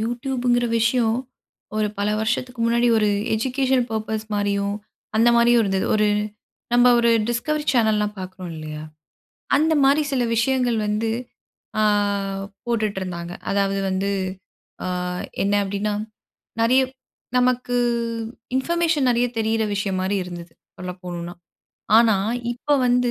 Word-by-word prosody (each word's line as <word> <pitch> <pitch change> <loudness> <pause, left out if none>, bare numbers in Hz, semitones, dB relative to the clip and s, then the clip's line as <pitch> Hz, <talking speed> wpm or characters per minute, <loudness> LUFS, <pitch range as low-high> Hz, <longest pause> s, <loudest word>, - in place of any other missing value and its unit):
YouTubeங்கிற 245 +1 0
விஷயம், 225 0 +2 0.6
ஒரு 215 -1 +2
பல 205 +1 0
வருஷத்துக்கு 240 +2 -2
முன்னாடி 235 +1 +3
ஒரு 210 -1 +3 0.3
எஜுகேஷன் 255 +1 +1
பர்ப்பஸ் 220 0 -3
மாரியும், 200 0 0 0.4
அந்தமாரியும் 235 +1 +5
இருந்துது. 195 -2 0
ஒரு 215 -1 +3 0.6
நம்ம 245 +1 +6
ஒரு 235 0 +4 0.2
டிஸ்கவரி 295 +6 -1
சேனல்லாம் 215 -3 +2
பாக்குறோம் 185 -1 -7
இல்லயா! 155 -1 -7 0.7
அந்தமாரி 290 -1 +4
சில 255 -2 +1
விஷயங்கள் 245 0 +1
வந்து, 210 +2 0 0.7
ஆ - - +3 0.8
போட்டுட்ருந்தாங்க. 190 -7 -2 0.2
அதாவது 195 0 +1
வந்து 190 +1 0 0.7
ஆ - - -2 0.6
என்ன 200 +1 +1
அப்டின்னா 205 +1 -2 0.7
நெறைய 250 +4 +4 0.6
நமக்கு 250 0 +1 0.8
இன்ஃபர்மேஷன் 325 0 +1
நெறைய 240 0 +3
தெரியிற 220 0 +1
விஷயம்மாரி 195 -1 -1
இருந்தது. 175 -2 -9 0.2
சொல்ல 180 0 -5
போணுன்னா. 175 -1 -5 0.6
ஆனா 225 -3 +5 0.4
இப்ப 285 +4 0
வந்து 245 0 +3
225 Hz, 110 wpm, -22 LUFS, 200-245 Hz, 0.8 s, நம்ம